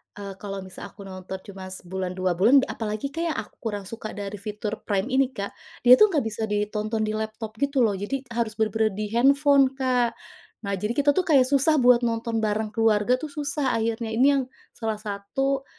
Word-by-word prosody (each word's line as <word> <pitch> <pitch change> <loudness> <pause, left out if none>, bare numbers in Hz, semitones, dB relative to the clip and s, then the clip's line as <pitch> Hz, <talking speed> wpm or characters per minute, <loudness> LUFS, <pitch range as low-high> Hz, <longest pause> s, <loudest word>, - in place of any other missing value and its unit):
eee, 200 -1 -7
kalau 195 -2 -6
misal 185 - -9
aku 200 - -13
nonton 190 0 -7
cuma 190 -2 -9
sebulan, 185 0 -5
dua 185 -1 0
bulan 235 +10 +5
apalagi 215 +4 -4
Kak, 330 +3 -2
yang 320 - -1
aku - - -6
kurang 205 -3 -4
suka 215 +2 -7
dari 200 0 -6
fitur 210 +1 -5
Prime 205 +5 0
ini 265 0 +3
Kak, 200 0 -4 0.3
dia 250 +1 +8
tuh 425 - +8
nggak 305 - 0
bisa 220 0 -3
ditonton 210 +1 -1
di 215 - -1
laptop 220 0 -4
gitu 280 -2 +2
loh. 220 - +3
Jadi, 205 +8 -3
harus 230 -2 -2
benar-benar 220 -1 0
di 215 - -2
handphone, 275 +3 +5
Kak. 250 -3 +1 0.5
Nah, 200 0 -2
jadi 215 +4 -2
kita 290 0 +4
tuh 360 +5 0
kayak 280 -6 +6
susah 280 +4 +3
buat 250 -3 +5
nonton 230 0 -1
bareng 215 0 -1
keluarga 225 +2 +2
tuh 310 - -5
susah 285 -3 -2
akhirnya. 225 0 -2
Ini 255 +4 +5
yang 265 - -1 0.3
salah 220 -2 -4
satu 265 +7 -2
220 Hz, 200 wpm, -25 LUFS, 205-265 Hz, 0.5 s, dia